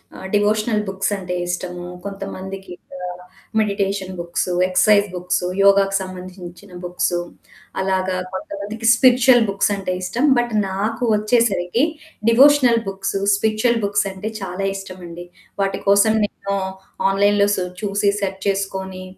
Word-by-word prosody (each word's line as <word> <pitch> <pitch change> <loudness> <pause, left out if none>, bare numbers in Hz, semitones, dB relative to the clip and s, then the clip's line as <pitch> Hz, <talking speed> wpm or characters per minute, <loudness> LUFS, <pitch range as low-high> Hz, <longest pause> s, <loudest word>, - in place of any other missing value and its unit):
ఆహ్, 190 - -8
డివోషనల్ 210 +1 +1
బుక్సంటే 195 -1 -2
ఇష్టము, 175 0 -4 0.2
కొంతమందికింకా 195 -2 -7 0.7
meditation 200 -2 -1
books, 170 +1 -2 0.2
exercise 205 +2 +4
books 180 0 -1 0.2
యోగాకి 195 0 +4
సంబంధించిన 185 0 -9
బుక్స్ 175 0 -1 0.6
అలాగా 190 -1 0 0.2
కొంతమందికి 205 +4 -4
స్పిరిచ్యువల్ 250 -1 +5
బుక్సంటే 195 -1 0
ఇష్టం. 235 +9 0
బట్ 240 -1 0 0.2
నాకు 210 +6 -2
వచ్చేసరికి 210 -1 +1 0.5
డివోషనల్ 255 -1 +6
బుక్స్, 195 0 -3 0.2
స్పిరిచ్యుల్ 220 +3 +1
బుక్స్ 200 0 +1
అంటే 190 +3 -5
చాలా 195 0 -3
ఇష్టమండి. 180 -3 -8 0.4
వాటి 195 0 -1
కోసం 200 +2 +5
నేను 200 -1 -4 0.5
ఆన్లైన్‌లో 200 +1 +3
సు 185 - -2 0.2
చూసి 200 0 +1
సెర్చ్ 190 -1 -3
చేసుకొని 190 -1 -2
195 Hz, 110 wpm, -20 LUFS, 185-210 Hz, 0.7 s, డివోషనల్